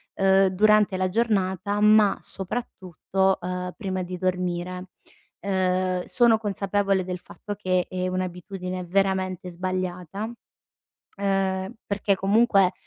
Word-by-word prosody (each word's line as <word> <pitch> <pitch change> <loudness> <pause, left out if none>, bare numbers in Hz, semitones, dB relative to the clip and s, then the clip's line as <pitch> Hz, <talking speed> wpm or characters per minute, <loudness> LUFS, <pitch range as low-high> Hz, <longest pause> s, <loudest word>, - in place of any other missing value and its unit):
uhm, 195 0 +4
durante 210 +1 +3
la 185 0 +1
giornata, 200 -1 0
ma 210 -1 +5
soprattutto, 190 -2 -2
uhm, 180 0 -4
prima 190 -4 -3
di 180 +1 -6
dormire. 180 0 -2 0.6
Uhm, 185 -1 0
sono 235 -2 +4
consapevole 200 -2 0
del 180 -1 -4
fatto 205 - -8
che 185 -3 0
è 185 0 -2
un'abitudine 185 0 -4
veramente 185 -1 0
sbagliata, 185 +1 -4 0.9
uhm, 195 0 -1
perché 200 0 +1
comunque 195 -1 +3
190 Hz, 105 wpm, -25 LUFS, 185-200 Hz, 0.9 s, ma